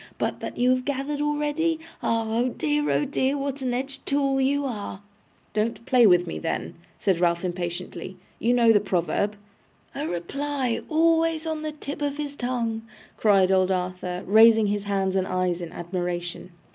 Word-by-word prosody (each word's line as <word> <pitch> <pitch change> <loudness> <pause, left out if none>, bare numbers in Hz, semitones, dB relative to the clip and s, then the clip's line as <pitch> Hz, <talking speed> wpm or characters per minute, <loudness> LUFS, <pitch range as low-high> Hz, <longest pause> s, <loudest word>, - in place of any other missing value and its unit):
But - - -2
that - - -6
you 250 +1 +3
have 255 0 +1
gathered 285 +2 -2
already? 295 +2 0 0.2
Ah! 230 0 +1
oh 235 +3 +1
dear, 295 +3 0
oh 295 - +2
dear, 275 0 0
what 275 0 -3
an 255 -1 -1
edged 265 +2 -4
tool 275 -1 +1
you 280 +2 +1
are!' 210 -6 -5 0.5
'Don't 225 +2 -1
play 245 -3 +5
with 180 -2 +5
me 80 - -5
then,' - - -3 0.2
said 190 -4 +1
Ralph 170 0 +1
impatiently. 175 +1 -4 0.2
'You 240 +2 +2
know 235 -2 +5
the 210 - +5
proverb.' 195 +2 0 0.6
'A 290 +3 -3
reply 265 +7 -2
always 325 0 +2
on 315 -1 -2
the 310 0 -3
tip 295 -1 -7
of 285 0 -1
his 290 -1 -4
tongue!' 240 -3 -2 0.3
cried 195 -3 +4
old 185 -1 +3
Arthur, 180 -1 -2
raising 220 +2 +6
his 205 0 -1
hands 195 -1 0
and 190 -1 +1
eyes 180 -1 0
in 170 - -6
admiration. 175 0 -4
230 Hz, 170 wpm, -25 LUFS, 185-285 Hz, 0.6 s, raising